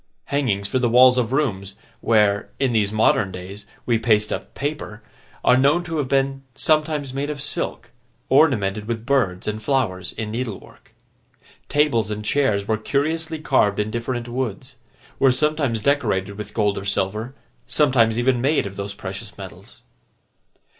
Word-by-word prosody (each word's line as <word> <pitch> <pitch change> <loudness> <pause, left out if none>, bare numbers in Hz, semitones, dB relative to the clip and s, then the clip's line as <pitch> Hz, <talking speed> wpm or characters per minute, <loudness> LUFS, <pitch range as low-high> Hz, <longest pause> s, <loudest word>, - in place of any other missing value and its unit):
Hangings 105 -9 0
for 130 - 0
the 120 -2 +1
walls 125 +1 +6
of 120 -1 -1
rooms, 100 -9 -1 0.2
where, 105 -3 +2
in 135 -2 +1
these 105 -3 +1
modern 110 -2 +2
days, 95 +3 -9 0.2
we 115 -2 +2
paste 110 -2 +2
up - - -7
paper, 140 -7 -5 0.4
are - - +6
known 140 +7 +3
to 165 -2 -4
have 145 -3 -1
been 135 0 0
sometimes 155 -3 0
made 140 +2 -2
of 150 -1 -4
silk, - - -4 0.4
ornamented 110 -8 +2
with 115 -1 -3
birds 115 -10 0
and 105 +1 -3
flowers 105 -8 -1
in 110 -1 -5
needlework. 115 -3 -7 0.7
Tables 140 -7 +2
and 105 0 -5
chairs 105 -7 +1
were 110 - +1
curiously 160 +7 -1
carved 130 -9 +2
in 105 +1 -1
different 120 +1 -3
woods; 130 +1 -4 0.4
were 135 -1 +5
sometimes 140 -4 +1
decorated 105 -9 +1
with 105 0 -8
gold 105 -2 +1
or - - -8
silver; 105 +6 -2 0.3
sometimes 120 -7 +3
even 120 0 +2
made 140 -2 +2
of 100 0 -7
those 100 0 -5
precious - - -7
metals. - - -12
120 Hz, 155 wpm, -22 LUFS, 105-140 Hz, 0.7 s, walls